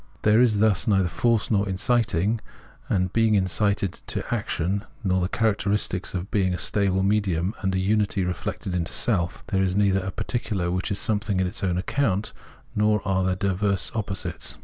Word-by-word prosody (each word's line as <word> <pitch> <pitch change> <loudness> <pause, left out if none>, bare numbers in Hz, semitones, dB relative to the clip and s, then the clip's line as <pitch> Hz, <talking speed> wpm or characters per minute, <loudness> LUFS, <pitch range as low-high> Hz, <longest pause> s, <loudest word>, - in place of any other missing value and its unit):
There 110 +2 +5
is 115 -4 +3
thus 110 +1 +2
neither 95 -4 +3
force 115 +4 +1
nor 100 -1 +1
inciting 105 +1 +1 0.5
and 90 0 0
being 115 -2 +3
incited 100 0 +1
to - - -3
action, 95 +5 -1 0.2
nor 95 -2 +1
the 90 - -1
characteristic 100 -3 0
of 90 +3 -4
being 95 -4 +1
a - - -4
stable 95 -2 +1
medium 95 -2 +1
and 95 -2 0
a - - +1
unity 100 0 +1
reflected 90 +1 -4
into 85 -1 -2
self, 90 -8 +1
there 95 -1 +1
is 95 -1 +1
neither 100 -1 +3
a 95 0 -4
particular 100 -3 -2
which 95 +3 -2
is 100 - 0
something 105 -2 0
on 95 - +2
its 100 +3 -4
own 90 -2 0
account, 100 0 -1 0.4
nor 105 0 +1
are 95 -1 +1
there 95 0 +1
diverse 100 0 0
opposites. 100 -4 -1
100 Hz, 175 wpm, -24 LUFS, 95-105 Hz, 0.5 s, There